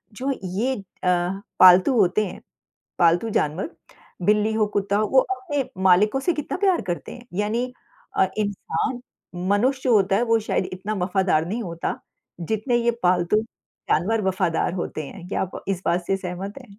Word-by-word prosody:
जो 265 +5 -2
ये 215 +9 -1
अ, 205 - -7 0.8
पालतू 185 +7 +8
होते 200 +3 +3
हैं, 185 - -8 0.6
पालतू 175 +6 +3
जानवर 165 - -1 0.5
बिल्ली 210 +3 +3
हो, 215 -1 +2
कुत्ता 200 -1 -1
हो, 215 +1 +2
वो 265 - +5
अपने 300 -5 -2 0.2
मालिकों 195 +7 +4
से 350 - +1
कितना 300 +3 -3
प्यार 375 -3 +3
करते 175 - -4
हैं। 245 0 -13
यानी 235 +4 -1 0.5
अ, 190 - +5
इंसान 205 +2 -2 0.5
मनुष्य 260 +6 +1
होता 195 -4 +4
है, 230 - +2
वो 230 -1 +3
शायद 185 - +1
इतना 190 +4 -4
वफ़ादार 180 -4 +1
नहीं 225 +6 -3
होता, 170 -3 -4 0.4
जितने 220 +8 0
ये 235 0 +2
पालतू-जानवर 185 +2 0
वफ़ादार 185 -3 0
होते 155 -4 -4
हैं। 180 +1 -10
क्या - - -2
आप 190 - -6
इस 190 -2 -1
बात 175 0 +1
से 195 - +1
सहमत 185 +2 -6
हैं? 200 0 -17
205 Hz, 160 wpm, -23 LUFS, 180-230 Hz, 0.8 s, पालतू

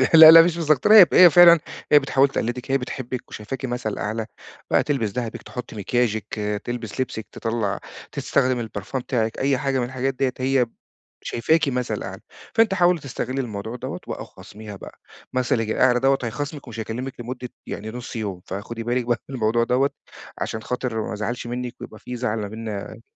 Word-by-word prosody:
لا، 160 0 +12
لا، 165 - +11
مش 170 0 +1
مستكترة 160 +5 +3
هي 200 -5 +11
ف - - -10
هي 180 -1 +9
فعلًا، 170 0 +8 0.3
هي 150 - +8
بتحاول 135 0 +3
تقلّدِك 125 +1 -3
هي 135 - +4
بتحبِّك 125 -1 -6
وشايفاكِ 120 +5 -6
مثل 120 -4 -3
أعلى، 110 +2 -3 0.5
بقى - - +4
تلبس 130 -8 -1
دهبِك، 120 -1 -4
تحُط 125 -2 -8
مكياجِك، 110 0 -1 0.3
تلبس 120 0 -4
لبسِك 110 -4 -4
تطَلّع 115 -3 -2 0.3
تستخدم 130 -2 +1
البرفان 120 +3 -4
بتاعِك، 115 -3 -2
أي 135 0 +2
حاجة 135 0 0
من 120 - 0
الحاجات 130 +2 -2
ديّة 130 0 0
هي 130 -1 +2
ب 115 - -26 0.5
شايفاكِ 160 +6 +1
مثل 125 -2 -2
أعلى، - - -7 0.3
فأنتِ 225 -3 +4
حاولي 175 -2 +3
تستغلّي 135 -1 -3
الموضوع 110 -1 -5
دوّة 125 - -5
وآه - - -5
وخاصميها 105 0 -11
بقى، - - -12 0.3
مثلًِك 125 -3 0
الأعلى 125 +2 +3
دوّة 135 +1 +3
هيخاصمِك 140 +4 -5
ومش 115 -1 -8
هيكلِّمِك 125 +4 -5
لمُدة 125 +1 -6 0.2
يعني 110 +2 -5
نُص 120 +1 -8
يوم، 100 -5 -4
فخُدي 115 +4 -5
بالِك 120 +1 -1
بقى 120 -1 0
من 135 - -5
الموضوع 115 0 +2
دوّة، 130 +4 +2 0.5
عشان 110 - -4
خاطر 125 -2 -2
ما - - -4
ازعلش 110 +3 -4
منّك 125 0 -4
ويبقى 110 - -9
في 125 - -7
زعل 115 -2 -2
ما 105 - -3
بينّا 110 -1 -6
125 Hz, 185 wpm, -23 LUFS, 110-135 Hz, 0.5 s, لا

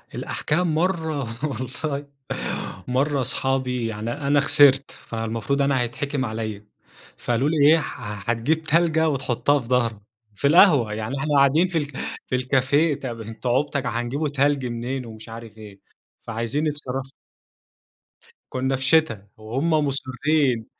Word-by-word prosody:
الأحكام 160 +1 -1
مرّة 160 -3 0 0.2
والله، 140 +2 -3 0.8
مرّة 135 +2 +1
اصحابي 130 -2 0
يعني 110 +1 -4
أنا 145 0 +1
خسرت، 140 -1 +5
فالمفروض 115 +4 -3
أنا 140 -2 +2
هيتحكِم 130 +3 -2
عليّا. 110 -2 -5 0.5
فقالوا 120 +5 0
لي 160 - 0
إيه: 165 - +5
"ح 105 -6 -6
هتجيب 155 +8 0
تلجة 160 0 +2
وتحُطّها 140 +1 +1
في 120 - -9
ضهرك." 120 -3 +1 0.4
في 140 - +1
القهوة، 145 - +5
يعني 110 +5 -3
إحنا 145 +1 0
قاعدين 145 +6 +4
في 180 - -2
ال 150 - 0 0.4
في 130 - -1
الكافيه، 135 +4 +2
طَب 120 -4 -5
أنتم 115 +3 -5
عُبط 140 +4 +1
ك 135 - -3
هنجيبوا 125 +6 -2
تَلْج 140 -1 +1
منين 125 +2 -3
ومش 110 0 -11
عارف 115 -1 -10
إيه، 105 -3 -12 0.4
فعايزين 115 +7 -1
يتصرّفوا 135 -3 -3 1.4
كُنّا 130 +1 0
في 130 - -5
شِتا 130 -8 +2
وهم 120 +9 -2
مُصرِّين 140 -4 +1
135 Hz, 135 wpm, -23 LUFS, 115-145 Hz, 1.4 s, خسرت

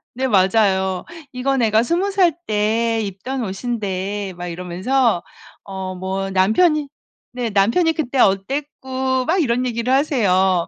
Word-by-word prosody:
네 265 +2 -1
맞아요. 190 -3 +2 0.3
"이거 265 +2 -1
내가 225 -3 +3
20 345 +9 0
살 370 -5 +3
때 225 +2 +1
입던 215 +7 -4
옷인데." 200 -2 -3
막 175 0 -6
이러면서 180 +6 0 0.4
어 190 -1 -6
뭐 190 +1 -3
"남편이." 285 - +2 0.4
네. 245 -2 -3
"남편이 230 - +3
그때 275 -5 -3
어땠고." 260 +4 0
막 345 +6 +1
이런 250 -2 0
얘기를 235 +1 -1
하세요. 190 - +2
225 Hz, 240 characters per minute, -20 LUFS, 190-265 Hz, 0.4 s, 내가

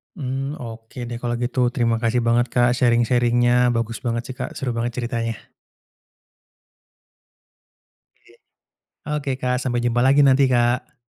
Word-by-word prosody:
Mmm, 135 -1 -4
oke 115 +2 -9
deh 120 - -5
kalau 120 -1 -2
gitu 125 0 +1
terima 115 -3 +1
kasih 120 +1 0
banget, 120 +1 +2
Kak, 120 0 +2
sharing-sharing-nya 120 0 +3
bagus 115 0 -2
banget 115 0 -1
sih, - - -10
Kak, - - -5
seru 130 -2 -3
banget 115 +1 -3
ceritanya. 115 -2 -3 2.9
Iya, - - -22 0.8
oke, 140 -1 -4
Kak, 125 0 0
sampai 120 -2 -1
jumpa 120 0 +1
lagi 140 +2 +5
nanti, 135 0 +5
Kak. 120 0 0
120 Hz, 135 wpm, -22 LUFS, 115-125 Hz, 2.9 s, lagi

